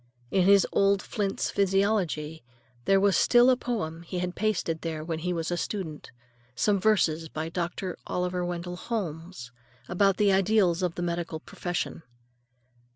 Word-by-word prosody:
In 185 -2 +3
his 200 -1 +6
old 200 0 +3
Flint's 200 0 -2
Physiology 195 - 0 0.4
there 195 0 +4
was 200 -1 +3
still 245 +6 +5
a - - +4
poem 205 -10 -3
he 170 +2 -6
had 180 0 -2
pasted 185 -6 -1
there 160 -2 -4
when 160 0 -3
he 180 +3 -2
was 165 -1 -2
a 175 - 0
student; 170 -6 -5 0.5
some 200 - +2
verses 165 -6 +2
by 155 +2 -4
Dr. 175 +2 -3
Oliver 180 0 -1
Wendell 175 0 -4
Holmes 170 - -5 0.4
about 195 +2 +2
the 205 -2 +4
ideals 190 -2 +3
of 180 -2 -1
the 175 - -3
medical 170 -2 -3
profession. 175 +1 -4
180 Hz, 155 wpm, -27 LUFS, 165-200 Hz, 0.5 s, his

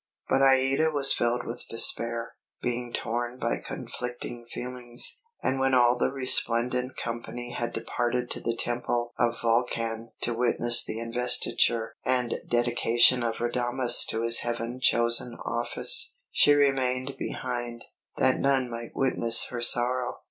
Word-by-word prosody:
But 135 - +1
Aïda 135 +3 +3
was 140 -2 +3
filled 120 +1 -1
with 120 +1 -6
despair, 115 0 0 0.3
being 120 0 -4
torn 120 +2 -4
by - - -2
conflicting 120 -1 -7
feelings; 120 - -1 0.2
and 130 - -1
when 135 0 +1
all 120 -1 +4
the 125 - -1
resplendent 125 -1 +2
company 120 +1 -6
had 120 -1 -4
departed 120 +2 -3
to - - -1
the 115 - -3
Temple 120 0 -3
of 120 -1 0
Vulcan 115 -1 -1
to 120 - 0
witness 120 0 +3
the 110 - -5
investiture 115 -1 +1
and 125 -2 0 0.2
dedication 120 +1 +2
of 115 -1 -2
Radames 120 +1 +2
to 115 +1 -2
his 115 0 +7
heaven 120 +1 -4
chosen 120 -1 +3
office, 445 - +2 0.2
she 145 - +4
remained 135 -2 0
behind, 120 -2 -5 0.3
that 130 0 +2
none 135 -3 0
might 115 0 -8
witness 115 -3 +1
her 120 -1 -5
sorrow. 120 +1 +2
120 Hz, 135 wpm, -26 LUFS, 120-125 Hz, 0.3 s, his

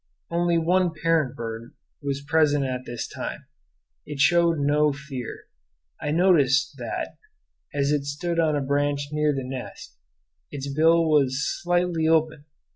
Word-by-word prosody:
Only 170 0 +2
one 175 +1 +2
parent 165 -5 +2
bird 115 0 -7 0.3
was 140 -1 -3
present 145 -3 +3
at 130 -1 -4
this 120 -1 -5
time. - - -6 0.6
It 145 - -8
showed 170 +2 +4
no 150 +1 +2
fear. 140 -4 -7 0.6
I 150 - -2
noticed 145 -5 +3
that, - - -5 0.5
as 140 0 0
it 145 -2 0
stood 165 +4 -2
on 155 -2 +2
a 145 - 0
branch 145 +1 0
near 150 0 +1
the 135 -2 -3
nest, 130 - -8 0.5
its 140 -1 -5
bill 165 +2 +4
was 145 -2 +2 0.2
slightly 175 -2 +1
open. 155 -2 +1
150 Hz, 140 wpm, -25 LUFS, 140-165 Hz, 0.6 s, showed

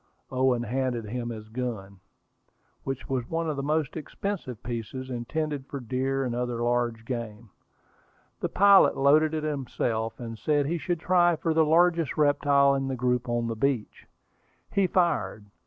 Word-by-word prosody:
Owen 130 -2 +2
handed 120 -1 -2
him 120 +2 -4
his 110 -2 -7
gun, 110 -5 -5 0.8
which 135 -1 -4
was 130 -3 -2
one 165 0 -1
of 155 - -1
the 140 - -3
most 150 +1 -1
expensive 160 - -5
pieces, 120 +3 -5
intended 140 +3 -3
for 140 - -5
deer 130 +2 -1
and 120 - -2
other 120 -1 -2
large 120 -2 0
game. 115 -3 -6 0.9
The - - -2
pilot 200 0 +6
loaded 150 +3 +4
it 155 - -2
himself, 120 -6 -2
and 115 -2 -7
said 145 -2 +1
he 170 +4 -1
should 175 +1 -2
try 175 -1 +4
for 160 +1 -1
the 160 0 +4
largest 165 -1 +3
reptile 145 -1 +4
in 135 -1 -1
the 135 - -2
group 125 0 0
on 120 0 0
the 115 -1 -2
beach. 125 -1 -2 0.6
He 195 -2 +2
fired. 170 - 0
130 Hz, 160 wpm, -27 LUFS, 120-155 Hz, 0.9 s, pilot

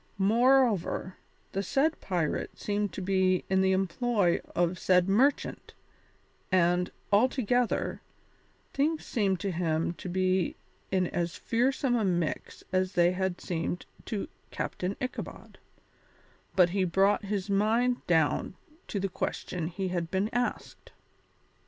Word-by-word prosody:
Moreover, 225 -3 +3 0.3
the 195 - -1
said 285 - +1
pirate 175 -5 -2
seemed 205 0 -1
to 190 - -5
be 185 -1 +2
in 190 0 +4
the 190 0 +3
employ 190 +1 +1
of 175 +1 +1
said 180 -1 +3
merchant, 255 +9 +1 0.8
and 180 0 +3 0.2
altogether, 245 +1 +2 0.7
things 305 +3 0
seemed 195 -5 0
to 200 - -1
him 165 -1 0
to 185 - -6
be 185 -1 +1 0.3
in 185 -1 +2
as 175 -1 -2
fearsome 250 +2 +1
a 230 - +1
mix 175 -5 -2
as 185 0 +1
they 175 0 +4
had 185 -1 -2
seemed 175 0 -3 0.2
to 210 -3 -3 0.2
Captain 185 +2 -3
Ichabod, 255 0 -6 1.0
but 180 -2 +5
he 195 0 +1
brought 195 +4 +2
his 200 -1 -2
mind 225 +5 +2
down 160 +1 +2 0.3
to 200 - -2
the 195 - 0
question 180 -2 -3
he 185 +2 -3
had 175 -2 -2
been 195 +5 0
asked. 245 0 -3
190 Hz, 125 wpm, -29 LUFS, 180-220 Hz, 1.0 s, but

